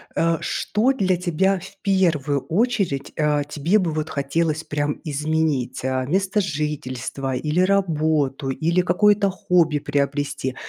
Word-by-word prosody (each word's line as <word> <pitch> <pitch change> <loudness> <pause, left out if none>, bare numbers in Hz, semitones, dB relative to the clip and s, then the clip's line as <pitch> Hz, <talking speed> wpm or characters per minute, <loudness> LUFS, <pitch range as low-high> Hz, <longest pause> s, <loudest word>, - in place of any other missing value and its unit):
э, 165 0 +2
что 240 +6 0
для 185 -7 +1
тебя 185 +2 +1
в 195 +2 -12
первую 165 -8 +1
очередь, 195 - 0
э, 150 -1 +2
тебе 165 +9 +2
бы 170 -4 0
вот 155 0 -3
хотелось 155 +2 -1
прям 150 -1 -2
изменить? 150 -4 -1
Э, 130 -1 -1
место 195 +5 +1
жительства 140 - -3
или 150 +6 -1
работу, 155 -8 +1
или 170 +6 +1
какое-то 200 +3 +3
хобби 170 -5 +1
приобрести? 145 -2 -2
155 Hz, 130 wpm, -22 LUFS, 145-185 Hz, -, какое-то